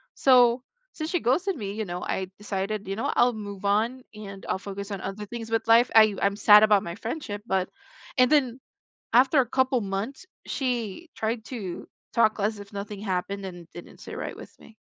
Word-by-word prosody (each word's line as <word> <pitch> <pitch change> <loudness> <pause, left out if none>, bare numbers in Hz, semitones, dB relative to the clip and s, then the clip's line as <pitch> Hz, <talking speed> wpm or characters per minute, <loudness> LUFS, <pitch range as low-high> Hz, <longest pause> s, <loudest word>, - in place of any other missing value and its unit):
so, 245 -1 +5 0.3
since 310 0 -4
she 355 - +1
ghosted 350 - +1
me, 200 -5 -5
you 215 0 -3
know, 180 0 -5
I 190 -1 -2
decided, 205 0 -3
you 195 - -2
know, 225 - -1
I'll 245 0 +4
move 205 -2 -7
on 225 +6 +1
and 200 -2 -9
I'll - - +1
focus 200 +1 -7
on 195 - -3
other 195 +2 -5
things 225 0 -7
with 225 0 0
life, 230 +2 +5
I 215 -2 +6
I'm 200 0 +2
sad 210 0 +7
about 210 -2 +5
my 170 0 -6
friendship, 220 -5 -5
but 190 -1 0 0.5
and 255 +2 +5
then, 265 -4 +2 0.5
after 265 +4 +5
a 250 - +1
couple 260 -1 +2
months, 200 - -4 0.2
she 250 - -3
tried 220 0 -2
to 200 -9 -6 0.2
talk 220 -2 +3
as 205 +1 -1
if 200 +1 -12
nothing 200 0 -6
happened 195 0 -3
and 175 -3 -8
didn't 175 - -11
sit - - -9
right - - -5
with - - -12
me. - - -15
215 Hz, 200 wpm, -26 LUFS, 200-245 Hz, 0.5 s, sad